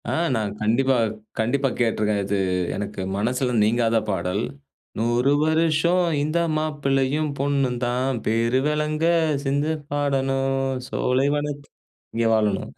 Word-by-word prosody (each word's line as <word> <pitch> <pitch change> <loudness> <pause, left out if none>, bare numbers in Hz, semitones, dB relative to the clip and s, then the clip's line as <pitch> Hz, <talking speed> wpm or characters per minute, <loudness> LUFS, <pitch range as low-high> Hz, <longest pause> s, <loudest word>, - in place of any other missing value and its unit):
ஆ. - - -1 0.2
நான் 105 -2 -1
கண்டிப்பா 130 +5 +2 0.4
கண்டிப்பா 135 +5 +1
கேட்டுருக்கேன். 105 -3 +1
இது 100 +1 -1 0.4
எனக்கு 100 -1 -4 0.2
மனசுல 125 +4 0
நீங்காத 115 +1 +2
பாடல். 90 +4 -1 0.6
"100 120 +4 +2
வருஷம் 165 +3 +2 0.2
இந்த 155 +3 0 0.2
மாப்பிள்ளையும், 150 -1 0
பொண்ணும் 135 -3 0
தான் 125 +1 -1
பேருவெளங்க 150 +7 +1 0.4
சிந்து 145 +3 0 0.2
பாடணும். 135 -2 0 0.3
சோலைவனத் 145 +2 0 0.5
இங்க 115 0 +1
வாழணும். 105 -3 0
135 Hz, 105 wpm, -23 LUFS, 115-145 Hz, 0.6 s, கண்டிப்பா